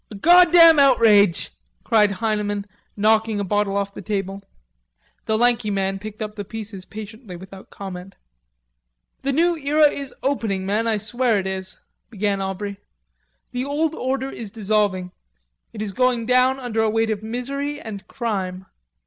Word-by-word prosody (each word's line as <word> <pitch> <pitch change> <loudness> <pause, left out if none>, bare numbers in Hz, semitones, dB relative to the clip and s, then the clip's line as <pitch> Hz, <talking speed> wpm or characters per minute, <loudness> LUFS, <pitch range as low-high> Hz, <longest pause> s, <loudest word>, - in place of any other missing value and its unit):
"A 215 - -9
goddam 340 - +7
outrage!" 220 -9 +4 0.3
cried 210 -2 +4
Heineman, 205 -1 -2 0.3
knocking 215 0 +2
a - - -1
bottle 200 0 0
off 200 0 -2
the - - -8
table. 195 -2 -3 0.9
The 220 - +2
lanky 240 -2 +2
man 195 -1 -1
picked 215 +2 -7
up 210 0 -7
the 205 - -5
pieces 205 -2 -8
patiently, 220 -1 -9
without 190 +2 -12
comment. 190 -1 -8 1.1
"The 275 - -1
new 340 +5 +2
era 300 +1 +4
is 275 -1 -6
opening, 220 -9 -1
men, 215 +4 0
I 220 -1 +1
swear 230 +2 0
it 190 - -2
is..." 190 0 -4 0.3
began 200 -2 -1
Aubrey. 195 +1 -4 0.7
"The 250 0 -2
old 300 +3 0
order 265 -2 -2
is 225 -3 -7
dissolving. 200 -3 0 0.6
It 215 -1 -5
is 205 - -4
going 245 +2 +1
down 255 +2 +3
under 235 -3 -2
a 220 - +2
weight 225 +1 +1
of 210 -1 -3
misery 275 +6 -4
and 205 -6 -8
crime.... 190 -5 -3
215 Hz, 155 wpm, -22 LUFS, 200-250 Hz, 1.1 s, goddam